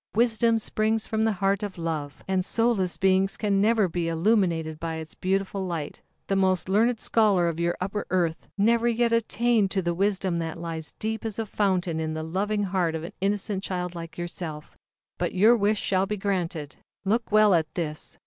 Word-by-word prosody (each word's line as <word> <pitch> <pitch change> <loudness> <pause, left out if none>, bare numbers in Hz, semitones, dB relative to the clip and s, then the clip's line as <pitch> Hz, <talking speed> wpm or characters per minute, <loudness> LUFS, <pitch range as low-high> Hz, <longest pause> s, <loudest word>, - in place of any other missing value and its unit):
Wisdom 230 0 +3
springs 220 0 0
from 220 -1 -1
the 220 0 +2
heart 195 +1 0
of 205 -3 -5
Love, 155 -4 -4
and 190 -1 +1
soulless 220 -4 +1
beings 190 0 +2
can 200 -2 +1
never 215 -1 +3
be 170 0 -2
illuminated 165 -3 +1
by 165 0 -3
its 160 -1 -7
beautiful 195 +1 -1
light. 165 -4 -5 0.2
"The 195 - 0
most 190 -1 +2
learned 225 +4 +2
scholar 205 -7 +3
of 165 -1 -2
your 170 0 0
Upper 195 +3 -3
Earth, 170 -3 0
never 230 +3 +3
yet 235 0 +2
attained 230 -2 +2
to 190 -1 -1
the 170 0 0
wisdom 190 -1 0
that 165 0 -4
lies 165 -1 -5
deep 220 0 -3
as 220 -3 -4
a 225 - -2
fountain 185 -5 0
in 155 0 -2
the 155 - -3
loving 205 +6 -1
heart 180 -4 0
of 160 - -4
an 170 - -7
innocent 200 0 0
child 180 -2 -3
like 165 -1 -8
yourself. 170 -3 -6 0.4
But - - -1
your 215 +6 +6
wish 210 -1 +1
shall 190 0 +1
be 210 +1 -2
granted. 175 -7 -3 0.3
Look 225 +4 0
well 215 -1 +6
at 160 -3 +1
this!" 155 -3 -4
190 Hz, 190 wpm, -26 LUFS, 170-215 Hz, 0.4 s, your